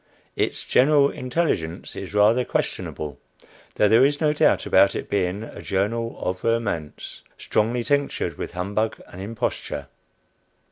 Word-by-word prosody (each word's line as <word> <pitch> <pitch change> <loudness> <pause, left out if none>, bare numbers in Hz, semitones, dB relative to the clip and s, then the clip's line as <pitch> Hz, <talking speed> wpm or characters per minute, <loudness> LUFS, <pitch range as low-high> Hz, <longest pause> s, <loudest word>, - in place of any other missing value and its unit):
Its - - -1
"general 140 +1 +4
intelligence" 125 - -2
is - - -6
rather 110 +4 +5
questionable, 75 - -3 0.6
though 105 - +4
there 115 +4 +6
is 145 +1 +2
no 150 -2 +2
doubt 150 - +3
about - - +4
its - - -4
being 95 +1 0
a - - -9
"journal 115 +4 -1
of 90 0 -3
romance," 100 -10 -2 0.2
strongly 120 +3 0
tinctured 145 +2 0
with - - -6
humbug 100 +5 -1
and 90 - -9
imposture. 110 +3 -3
110 Hz, 135 wpm, -24 LUFS, 95-125 Hz, 0.6 s, there